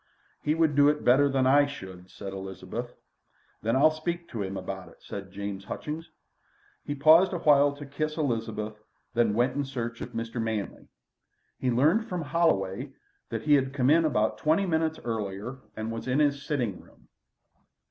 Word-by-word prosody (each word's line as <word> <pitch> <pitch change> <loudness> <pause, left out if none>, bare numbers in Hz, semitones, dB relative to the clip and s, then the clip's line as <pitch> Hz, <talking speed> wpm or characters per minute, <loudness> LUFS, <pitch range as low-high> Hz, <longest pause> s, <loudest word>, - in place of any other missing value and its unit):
"He 150 +1 +1
would 160 -2 +3
do 145 0 +6
it 150 0 0
better 140 +3 +5
than 135 -1 +2
I 145 +2 +5
should," 95 -9 -9
said 95 0 -8
Elizabeth. 95 +5 -6 0.7
"Then 115 +3 +1
I'll 150 +4 +6
speak 170 +2 -4
to 115 - -4
him 95 0 -3
about - - -6
it," - - -18
said 100 -1 -7
James 100 0 -5
Hutchings. 155 - -5 0.7
He 145 - -3
paused 160 +7 +6
a - - 0
while 145 -3 +5
to 145 0 -9
kiss 155 +3 -3
Elizabeth, 110 -6 -2 0.3
then 115 -3 +2
went 120 +3 +2
in 145 - 0
search 120 -4 -5
of - - -6
Mr. 115 +1 -3
Manley. 110 -3 -3 0.7
He 130 - 0
learned 160 - +3
from 180 -2 -2
Holloway 135 - 0 0.4
that 115 -2 -4
he 150 - +4
had 135 -2 +3
come 135 0 +3
in 165 +1 +5
about 110 -7 +1
twenty 160 - +2
minutes 160 -2 0
earlier 110 +2 -4 0.2
and 110 +1 -4
was 115 +2 -5
in 130 +1 +1
his 145 -2 +2
sitting 125 - -2
room. - - -22
130 Hz, 180 wpm, -28 LUFS, 110-150 Hz, 0.7 s, do